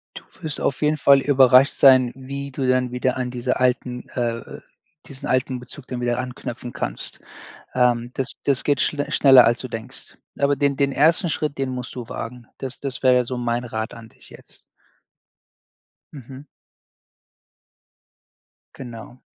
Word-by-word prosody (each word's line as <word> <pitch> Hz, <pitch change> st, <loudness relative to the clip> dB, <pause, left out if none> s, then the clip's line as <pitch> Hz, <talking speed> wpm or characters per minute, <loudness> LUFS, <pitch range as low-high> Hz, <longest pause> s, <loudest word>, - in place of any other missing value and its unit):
Du -, -, -9 dB, 0.2 s
wirst 155 Hz, -3 st, -3 dB
auf 130 Hz, 0 st, -1 dB
jeden 150 Hz, +1 st, +2 dB
Fall 140 Hz, -1 st, +5 dB
überrascht 130 Hz, -1 st, +5 dB
sein, 130 Hz, -3 st, +6 dB
wie 140 Hz, +1 st, -7 dB
du 130 Hz, -1 st, -2 dB
dann 130 Hz, -1 st, +1 dB
wieder 125 Hz, 0 st, -1 dB
an 125 Hz, -1 st, -2 dB
dieser 125 Hz, +1 st, -2 dB
alten, 125 Hz, -1 st, -1 dB
äh 115 Hz, -2 st, -4 dB, 0.5 s
diesen 135 Hz, -2 st, -8 dB
alten 130 Hz, 0 st, 0 dB
Bezug 130 Hz, +2 st, -9 dB
dann 125 Hz, -1 st, -5 dB
wieder 120 Hz, 0 st, 0 dB
anknüpfen 125 Hz, -1 st, -6 dB
kannst. -, -, -5 dB, 0.5 s
Ähm, 120 Hz, 0 st, +1 dB
das 135 Hz, -1 st, -2 dB
das 140 Hz, -2 st, +2 dB
geht 145 Hz, -3 st, +1 dB
schl 145 Hz, -1 st, -1 dB
schneller 135 Hz, -3 st, +7 dB
als 120 Hz, +1 st, +2 dB
du 130 Hz, -, -5 dB
denkst. 115 Hz, +3 st, -8 dB, 0.2 s
Aber 140 Hz, 0 st, +2 dB
den 140 Hz, -1 st, +1 dB
den 140 Hz, -1 st, +1 dB
1. 165 Hz, +6 st, +3 dB
Schritt, 150 Hz, -2 st, -2 dB
den 135 Hz, -1 st, -1 dB
musst 125 Hz, 0 st, -6 dB
du 120 Hz, -2 st, -7 dB
wagen. 120 Hz, 0 st, -7 dB
Das 130 Hz, -1 st, -5 dB
das 135 Hz, -2 st, -5 dB
wäre 125 Hz, -1 st, +4 dB
so 125 Hz, +1 st, -4 dB
mein 120 Hz, 0 st, -2 dB
Rat 110 Hz, -1 st, -4 dB
an 115 Hz, -1 st, -12 dB
dich -, -, -18 dB
jetzt. -, -, -13 dB, 1.5 s
Mhm. 135 Hz, +1 st, -11 dB, 2.3 s
Genau. 120 Hz, 0 st, -10 dB
130 Hz, 160 wpm, -22 LUFS, 125-140 Hz, 2.3 s, schneller